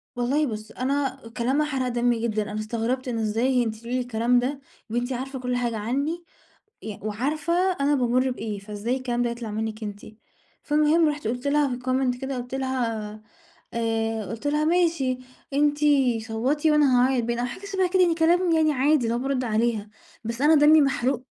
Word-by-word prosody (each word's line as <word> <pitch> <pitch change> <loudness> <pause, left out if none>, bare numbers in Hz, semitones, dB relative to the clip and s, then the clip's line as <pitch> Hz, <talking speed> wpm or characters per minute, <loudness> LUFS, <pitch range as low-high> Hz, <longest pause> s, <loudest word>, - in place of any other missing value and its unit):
والله 260 +5 +1
بُص، 215 -2 -6
أنا 270 0 -1 0.2
كلامها 265 +5 +1
حرق 265 -4 -1
دمي 240 -1 +1
جدًا. 215 -2 -2
أنا 210 - -3
استغربت 230 +4 -2
إن 235 -2 -2
إزاي 240 +4 +1
أنتِ 220 -1 -3
تقولي 235 +3 -5
لي 255 - +1
الكلام 245 0 +2
ده! 270 +3 -2 0.3
وأنتِ 240 +3 -1
عارفة 265 +1 -5
كل 250 0 -2
حاجة 240 -2 -1
عني، 280 +10 -2 0.6
ي 215 -2 -6
وعارفة 275 +10 -2 0.3
أنا 285 +1 +3
بامُر 255 0 +2
بإيه، 220 -4 -4
فإزاي 210 +5 -3
الكلام 245 -2 -1
ده 240 - 0
يطلع 235 -2 -6
منِك 220 +1 -4
أنتِ؟ 205 -1 -6 0.6
فالمهم 305 +2 +3
رُحت 295 -4 -3
قُلت 245 +4 -3
لها 290 0 +3
في - - -11
الcomment 255 0 0
كده 270 0 -3
قُلت 245 +1 -6
لها 240 -5 -2 0.6
آآ، 225 -1 -1
قُلت 225 +9 -5
لها: 300 +1 +1
"ماشي، 325 -7 +2 0.4
أنتِ 290 +1 +2 0.5
صَوَّتي 270 +8 +1
وأنا 280 -5 +4
هاعيط 260 -3 +1
باين." 235 +1 -2
أو 245 - 0
حاجة 250 +11 -7
شبه 385 -2 0
كده 375 +1 +3
يعني، 345 -2 +4
كلام 325 -1 +3
عادي 290 0 +2
اللي 230 0 0
هو 240 - -1
بارُد 265 -1 -1
عليها، 220 -2 0 0.3
بس 230 +3 -4
أنا 310 +2 +6
دمي 300 +1 +7
محروق. 265 -2 0
250 Hz, 180 wpm, -25 LUFS, 230-285 Hz, 0.6 s, دمي